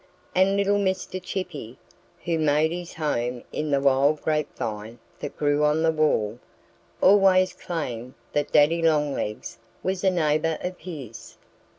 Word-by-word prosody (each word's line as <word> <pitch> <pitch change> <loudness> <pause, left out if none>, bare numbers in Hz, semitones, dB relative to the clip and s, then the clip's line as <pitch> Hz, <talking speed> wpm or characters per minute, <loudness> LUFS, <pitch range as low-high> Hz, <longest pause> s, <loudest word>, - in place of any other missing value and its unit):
And 190 +2 +3
little 200 0 +2
Mr. 190 -1 -2
Chippy, 175 - -6 0.5
who 165 -1 0
made 155 +1 +2
his 175 0 -6
home 125 -6 -2
in 155 0 -3
the 140 -1 +2
wild 140 +2 +3
grapevine 115 -7 -3 0.2
that 145 - -6
grew 145 0 +2
on 150 +2 +2
the 165 - +4
wall, 120 -8 +1 0.6
always 185 -2 +5
claimed 130 -8 -5 0.2
that 145 0 0
Daddy 155 +3 +4
Longlegs 150 -9 -1 0.2
was 185 0 -2
a 190 - +5
neighbor 160 -2 +1
of 180 0 -4
his. 140 - -9
155 Hz, 135 wpm, -25 LUFS, 140-180 Hz, 0.6 s, always